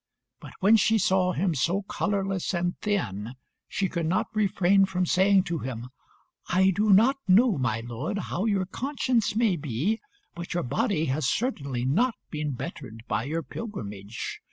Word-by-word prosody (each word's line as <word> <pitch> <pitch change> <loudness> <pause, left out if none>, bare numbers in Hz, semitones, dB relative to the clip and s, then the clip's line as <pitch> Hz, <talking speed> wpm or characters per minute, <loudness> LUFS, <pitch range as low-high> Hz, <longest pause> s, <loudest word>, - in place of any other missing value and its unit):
But - - -11
when 210 +4 +6
she 220 +2 +3
saw 190 -3 +2
him 180 +1 0
so 170 +8 0
colourless 195 -2 -1
and 175 +1 -1
thin, 120 - -2 0.3
she 195 - -1
could 170 -3 -2
not 180 +3 0
refrain 195 -2 +3
from 185 -1 -1
saying 190 +2 +4
to 170 -3 -3
him 125 -2 -6 0.6
"I 190 +2 +4
do 210 +3 +2
not 230 +8 +5
know, 200 - +5
my 115 -4 0
lord, 120 - -4
how 200 -1 -3
your 200 -4 +1
conscience 250 0 -1
may 220 -6 +2
be, 150 - -1 0.3
but 170 0 -6
your 175 - 0
body 200 - 0
has 145 -2 0
certainly 140 - -1
not 225 - +2 0.2
been 150 -2 -2
bettered 125 -5 -7
by 110 - -1
your 160 +3 -2
pilgrimage. 105 - -6
185 Hz, 160 wpm, -27 LUFS, 140-205 Hz, 0.6 s, when